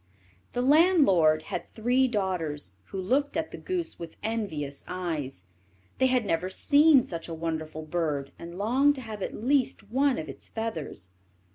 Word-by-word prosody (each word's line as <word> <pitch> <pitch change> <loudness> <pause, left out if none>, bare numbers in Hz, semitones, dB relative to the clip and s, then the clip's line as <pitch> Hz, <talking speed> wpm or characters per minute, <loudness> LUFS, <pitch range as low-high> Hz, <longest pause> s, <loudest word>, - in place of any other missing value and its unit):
The 245 - 0
landlord 260 - +5
had - - -5
three 250 +4 +3
daughters, 165 - -2
who 190 - -6
looked 270 +12 0
at 320 0 -2
the - - -7
goose 360 -2 -3
with 170 -1 -8
envious 165 -11 -3
eyes. 160 - -4 0.6
They 260 - +5
had 255 -3 +2
never 180 0 0
seen 285 +6 +5
such 165 -1 -6
a 165 - -5
wonderful 160 -1 -4
bird, 150 -4 -2
and 170 +1 -8
longed 260 +8 +3
to 265 - -7
have 220 -4 -7
at - - -3
least 255 -3 0
one 270 +1 +2
of 155 - -4
its 135 - -9
feathers. 165 - -4
195 Hz, 160 wpm, -28 LUFS, 160-260 Hz, 0.6 s, landlord